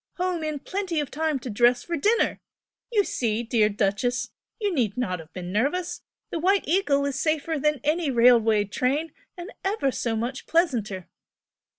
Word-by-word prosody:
home 360 Hz, -2 st, -1 dB
in 305 Hz, -1 st, -2 dB
plenty 370 Hz, +1 st, -3 dB
of 290 Hz, -, -3 dB
time 310 Hz, 0 st, 0 dB
to 255 Hz, -, -8 dB
dress 240 Hz, +2 st, +3 dB
for 340 Hz, -, -3 dB
dinner! 425 Hz, +10 st, +2 dB, 0.5 s
You 420 Hz, -3 st, +3 dB
see, 230 Hz, -, -1 dB
dear 225 Hz, -3 st, +2 dB
'Duchess' 220 Hz, +5 st, -1 dB, 0.3 s
you 410 Hz, -3 st, 0 dB
need 230 Hz, -, 0 dB
not 185 Hz, -8 st, -1 dB
have 160 Hz, 0 st, -12 dB
been 180 Hz, +1 st, -6 dB
nervous, 285 Hz, -, -1 dB, 0.3 s
the 335 Hz, -, -2 dB
'White 385 Hz, +4 st, +2 dB
Eagle' 290 Hz, -5 st, +2 dB
is 275 Hz, -1 st, -2 dB
safer 315 Hz, 0 st, 0 dB
than 300 Hz, 0 st, +1 dB
any 305 Hz, +1 st, +1 dB
railway 230 Hz, -4 st, +5 dB
train, 270 Hz, +10 st, -1 dB, 0.3 s
and 355 Hz, +5 st, -7 dB
ever 385 Hz, -9 st, 0 dB
so 230 Hz, -2 st, -2 dB
much 240 Hz, +4 st, -4 dB
pleasanter!" 230 Hz, -, 0 dB
275 Hz, 170 wpm, -25 LUFS, 230-330 Hz, 0.5 s, railway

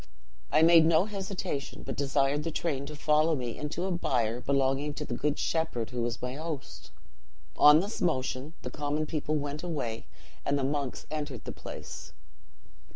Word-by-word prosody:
"I 155 Hz, -, +5 dB
made 165 Hz, 0 st, +8 dB
no 165 Hz, +2 st, +5 dB
hesitation, 195 Hz, -7 st, -4 dB
but -, -, -4 dB
desired 140 Hz, +1 st, +1 dB
the 165 Hz, -, -1 dB
train 145 Hz, -4 st, -2 dB
to 150 Hz, -, -7 dB
follow 155 Hz, +2 st, +3 dB
me 120 Hz, -4 st, -3 dB
into 150 Hz, +4 st, -3 dB
a 190 Hz, -, -1 dB
byre 120 Hz, -8 st, 0 dB
belonging 140 Hz, +2 st, +1 dB
to -, -, -4 dB
the -, -, -4 dB
good 145 Hz, +4 st, 0 dB
shepherd 160 Hz, -9 st, -1 dB
who 125 Hz, -1 st, -2 dB
was 120 Hz, 0 st, -1 dB
my 125 Hz, 0 st, -2 dB
host. 155 Hz, -1 st, -6 dB, 0.7 s
On 150 Hz, +2 st, +8 dB
this 205 Hz, +3 st, -5 dB
motion 140 Hz, -2 st, -1 dB
the -, -, -4 dB
common 150 Hz, +1 st, -1 dB
people 155 Hz, -1 st, -1 dB
went 145 Hz, 0 st, -2 dB
away, 135 Hz, -10 st, -3 dB, 0.4 s
and 145 Hz, -, +1 dB
the 140 Hz, -, -1 dB
monks 140 Hz, -1 st, -2 dB
entered 145 Hz, -6 st, -4 dB
the -, -, -5 dB
place. -, -, -8 dB
145 Hz, 170 wpm, -30 LUFS, 135-160 Hz, 0.7 s, made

